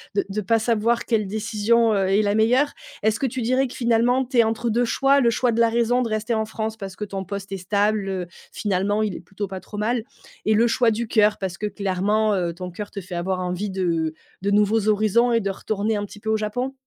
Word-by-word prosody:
de 200 - +1
de 200 +2 -3
pas 225 +3 +2
savoir 230 +1 +1
quelle 215 -4 0
décision, 220 +2 +1
heu, 195 -2 +1
est 200 +2 +3
la 205 0 +1
meilleure. 250 +7 +3 0.3
Est-ce 220 0 +2
que 270 - +1
tu 255 +1 -4
dirais 255 +3 +2
que - - -10
finalement 240 +2 +2
tu 255 0 -3
es 230 - +8
entre 225 +1 -1
2 240 +2 +2
choix, 275 +3 +3
le 235 - +4
choix 240 +2 +1
de 230 - -1
la 230 -1 +5
raison 235 +2 +2
de 235 - -1
rester 215 +2 -1
en 220 0 0
France 220 0 -4
parce 195 -3 -8
que 210 - -4
ton 195 -1 -5
poste 200 +1 -6
est 195 - -3
stable, 195 -1 0 0.2
finalement, 205 +1 0
il 205 -4 -2
est - - -6
plutôt 200 0 -6
pas 190 0 -6
trop 210 - -10
mal. 225 +2 0 0.4
Et 215 - +3
le 230 - +4
choix 235 0 +3
du 225 +1 -2
coeur 210 -1 +3
parce 185 -3 -4
que 210 - -2
clairement, 205 +2 0
heu, 175 -3 -1
ton 180 +1 -7
coeur 205 +3 -6
te 200 - -6
fait 180 0 -8
avoir 185 +2 -1
envie 180 +3 -2
de 170 -4 -1 0.3
de 200 +1 0
nouveaux 210 +1 +3
horizons 215 +3 +3
et 230 - +4
de 200 - -2
retourner 210 +2 -2
un 205 - -2
petit 205 - -12
peu 220 - -5
au 220 - +2
Japon? 245 +5 -3
215 Hz, 250 wpm, -23 LUFS, 195-230 Hz, 0.4 s, es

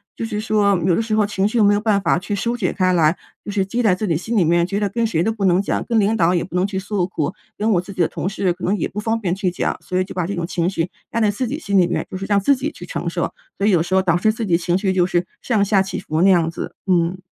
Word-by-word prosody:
就 - - -5
是 210 -2 -3
说， 210 -2 +2
有 180 -2 +3
的 - - +1
时 220 -1 -3
候 215 -1 +3
情 200 -1 -1
绪 225 - -2
又 220 - +5
没 205 0 +5
有 205 - +2
办 210 -3 +2
法 175 - +2
去 195 +3 -4
疏 230 +4 -1
解 200 -7 -1
开 185 -1 +1
来。 165 0 +3 0.3
就 205 - -4
是 200 -2 0
积 235 +5 -2
在 205 -5 +4
自 210 +3 -2
己 165 - +1
心 220 +8 -2
里 180 - +4
面， 170 +1 +3
觉 200 +3 -2
得 205 - +1
跟 230 +4 -1
谁 170 -7 0
都 200 - +1
不 210 -3 -5
能 185 0 +4
讲。 - - -2
跟 230 -2 +1
领 210 +2 +2
导 175 -4 +3
也 175 - +1
不 180 - -9
能 180 - +2
去 195 -1 -3
诉 195 -2 -1
苦， 170 -2 -3 0.2
跟 215 +2 0
我 175 -4 +3
自 180 - -10
己 - - -13
的 165 - +4
同 185 - -3
事， 195 -3 0
可 180 - -13
能 200 +3 +1
也 - - -1
不 210 - -5
方 225 +1 0
便 180 -5 -1
去 190 -2 -1
讲。 180 - -1
所 185 0 -2
以 185 - +1
就 - - -10
把 180 -2 -1
这 200 - -3
种 170 -2 -3
情 175 -1 0
绪 175 -2 -2 0.2
压 230 - -1
在 215 -2 +3
自 205 +5 -2
己 285 +6 -4
心 200 -10 0
里 180 - +5
面 175 - -2
就 - - -7
是 190 +1 -4
让 200 - +4
自 275 +8 +3
己 285 +4 -3
去 - - -10
承 - - -3
受。 - - -2 0.2
所 200 - +1
以 - - +4
有 170 -4 +3
时 175 +2 -4
候 190 - +5
导 175 -3 +2
致 215 +5 +2
自 225 +1 -4
己 175 -4 +2
情 175 +1 0
绪 190 -1 0
就 180 -1 +3
是 175 -1 0 0.2
上 215 -5 +1
下 200 -1 +3
起 195 - -3
伏 155 +1 -2
那 195 - +5
样 170 -3 +4
子， 165 - -6
嗯。 175 0 +2
195 Hz, 360 characters per minute, -20 LUFS, 180-210 Hz, 0.3 s, 又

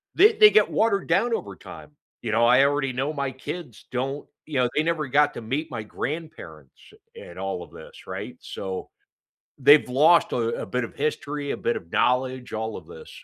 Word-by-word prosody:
they 420 +5 +6
they 425 -1 +8
get 215 - +4
watered 210 -3 +1
down 235 0 +2
over - - -4
time, - - -12 0.3
you 115 - -3
know, 115 +2 +3
I 125 +3 +6
already 140 -2 0
know 135 +5 -2
my 140 -2 -2
kids 130 0 -8
don't 135 +3 -3 0.2
You 145 -4 -2
know, 125 - +2
they 155 - +2
never 160 -3 -1
got 145 +3 +3
to - - -6
meet 135 +8 -3
my 115 -3 -4
grandparents 105 - -8 0.2
and 85 - -11
all 95 -2 -3
of - - -15
this, - - -13
right? - - -6
So, 95 -1 -6 0.7
they've 145 +1 +6
lost 155 +7 +4
a 115 -1 -1
a - - -5
bit 125 -1 -2
of 115 - -8
history, 145 -1 -3
a - - -3
bit - - -1
of 85 - -12
knowledge, 130 0 0
all 110 0 -3
of - - -12
this. 470 0 -12
135 Hz, 200 wpm, -24 LUFS, 120-155 Hz, 0.7 s, they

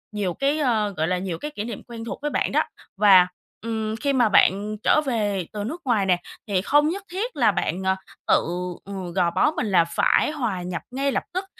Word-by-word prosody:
nhiều 195 -4 -1
cái, 280 - 0
ơ, 225 -7 +1
gọi 160 +1 +1
là, 180 +1 +1
nhiều 180 -3 -4
cái 300 - -6
kỷ 210 - -5
niệm 225 -2 -6
quen 230 -1 -8
thuộc - - -6
với 295 0 -2
bạn - - 0
đó - - +3 0.3
và, 190 -3 +7 0.3
ừm, 220 -1 -3
khi 280 +4 -1
mà 245 -4 +3
bạn 205 +2 +3
trở 305 - +4
về 205 -7 -1
từ 210 -1 -3
nước 320 +11 -5
ngoài 220 -6 +2
nè 180 -2 +3 0.3
thì 195 -3 +1
không 295 +7 +3
nhất 385 +4 -4
thiết 445 +7 -3
là - - +4
bạn, 185 +2 -2
ờ, 190 0 +2 0.3
tự, - - +4 0.4
ừ, 190 -3 -6
gò 175 -3 +2
bó 300 - +3
mình 250 - -2
là 180 -3 +5
phải - - +3
hòa 235 -11 -2
nhập 175 -1 -4
ngay 275 +2 0
lập - - -1
tức, 370 +2 -2
215 Hz, 230 wpm, -24 LUFS, 190-275 Hz, 0.4 s, và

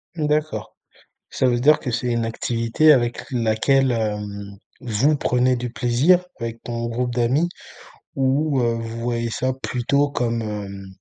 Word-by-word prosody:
Mmh 155 -3 -1
d'accord. 150 0 -1 0.5
Ça 130 - +1
veut 120 -1 +2
dire 150 +5 +5
que 125 - -4
c'est 125 +2 -2
une 115 -1 0
activité 115 +6 +2
avec 120 -2 -1
laquelle, 125 +3 +2
hem, 105 -3 -3 0.3
vous 125 +6 +1
prenez 125 -1 +2
du 125 0 -4
plaisir 130 +11 +3 0.2
avec 115 -1 -5
ton 115 0 -3
groupe 120 +1 -2
d'amis 130 +8 +1 0.7
ou, 135 +1 +1
heu, 115 -1 +1
vous 115 0 -5
voyez 115 -1 -2
ça 130 +3 -1
plutôt 135 +2 0
comme, 120 -3 -1
hem, 100 -2 -6
120 Hz, 155 wpm, -22 LUFS, 115-135 Hz, 0.7 s, dire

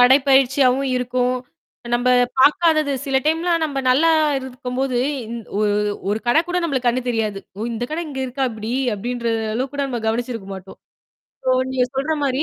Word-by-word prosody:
நடை 255 +2 +7
பயிற்சியாவும் 265 0 +4
இருக்கும். 250 0 0 0.6
நம்ப 245 +1 +2 0.3
பாக்காதது. 310 +1 +4
சில 270 -2 0
டைம்லாம் 330 +2 +1
நம்ப 285 -3 -3
நல்லா 280 +6 +4 0.3
இருக்கும்போது 255 0 -3 0.6
ஒரு 210 -1 +2 0.4
ஒரு 210 - 0
கட 240 +6 +4
கூட 360 - -1
நம்மளுக்கு 265 -7 0
கண்ணு 250 +2 0
தெரியாது. 220 -4 -1 0.2
ஓ! - - -6
இந்த 230 +1 -3
கடை 320 +2 -2
இங்க 270 -2 -5
இருக்கா 260 +1 -2
இப்டி. 220 +1 -5 0.2
அப்படின்ற 235 +3 -4 0.3
அளவுக்கு 260 +4 -2
கூட 285 - -1
நம்ம 245 -3 -3
கவனிச்சிருக்க 230 -2 -2
மாட்டோம். 190 0 -11 0.7
சோ - - -1 0.2
நீங்க 255 -1 +1
சொல்ற 275 +4 -1
மாரி 270 +1 +1
255 Hz, 160 wpm, -21 LUFS, 240-275 Hz, 0.7 s, நடை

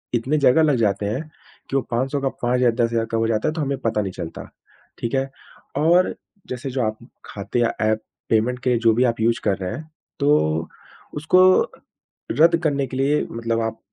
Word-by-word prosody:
इतनी 130 +6 0
जगह 145 +3 +5
लग 150 -3 +3
जाते 105 -3 +1
हैं 110 +7 -2 0.5
कि - - -3
वो 135 - +3
500 130 +4 -1
का 135 - +1
5000-10,000 120 -2 +1
कब 115 - 0
हो 115 - +1
जाता 110 +2 0
है - - -3
तो 160 - -3
हमें 140 -1 -1
पता 115 -4 0
नहीं 95 -2 -3
चलता। 85 -3 -7 0.5
ठीक 115 - -3
है? 135 0 0 0.5
और 170 +5 +3 0.3
जैसे 130 +2 -4
जो 130 0 -1
आप 110 0 -2 0.3
ख़ाते 100 +4 -4
या 115 -1 +2
एप 110 0 +1 0.3
पेमेंट 115 +3 +1
के 130 - +1
लिए 120 - +2
जो 115 -1 +4
भी 120 - +2
आप 115 -1 0
यूज़ 115 +1 +2
कर 95 - +2
रहे 90 -1 -4
हैं 155 0 -7 0.3
तो 80 - +2 0.5
उसको 160 +5 +3 0.9
रद्द 165 +6 +5
करने 140 -3 0
के 130 - -6
लिए 140 +3 +2
मतलब 115 0 -1
आप 115 0 -3
120 Hz, 200 wpm, -22 LUFS, 115-140 Hz, 0.9 s, जगह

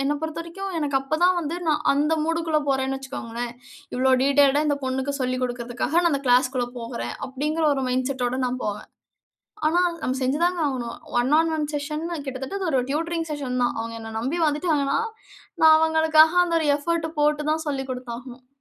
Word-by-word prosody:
என்னை 290 +2 +1
பொறுத்தவரைக்கும். 335 +5 -5
எனக்கு 285 -2 +1
அப்போ 270 +4 -2
தான் 365 0 +4
வந்து 330 +1 -3
நான் 300 -1 +1
அந்த 295 +3 +1
மூடுக்குள்ள 325 -1 0
போறேன்னு 265 0 0
வச்சுக்கோங்களேன். 240 -3 -5 0.4
"இவ்வளோ 260 +1 +3
டீட்டெயில்ட்டா 280 +1 +4
இந்த 290 -1 +1
பொண்ணுக்கு 265 +2 -2
சொல்லிக் 255 0 -1
குடுக்கறதுக்காக, 245 +3 -3
நான் 345 -1 +2
அந்த 280 - -1
கிளாஸ்க்குள்ள 250 0 +3
போகறேன்." 120 - -5
அப்படிங்கிற 300 +5 -1
ஒரு 270 -2 -1
மைண்ட் 255 +1 0
செட்டோட 255 -1 -1
நான் 255 +1 -3
போவேன். 210 0 -5 0.8
ஆனா 335 +3 +3 0.2
நம்ம 260 -3 -1
செஞ்சு 260 +3 0
தான் 355 +1 +2
ஆகணும். 250 -5 -2 0.2
1 245 +2 +1
ஆன் 325 0 +3
1 305 - -1
செஷன்னா 305 +4 -3
கிட்டத்தட்ட 265 +7 -5
அது 380 - -2
ஒரு 265 -4 +2
டியூட்டரிங் 330 +2 -1
செஷன் 265 -4 -2
தான். 240 - +2
அவங்க 230 0 -4
என்னை 225 0 -7
நம்பி 265 +9 -2
வந்துட்டாங்கன்னா, 295 -2 +1 0.6
நான் 315 -1 +8
அவங்களுக்காக 320 0 +5
அந்த 335 -1 0
1 315 - 0
எஃபோர்ட் 325 +2 -1
போட்டு 300 0 +2
தான் 315 +1 0
சொல்லி 275 -2 -2
குடுத்தாகணும். 250 0 -7
280 Hz, 175 wpm, -24 LUFS, 255-315 Hz, 0.8 s, நான்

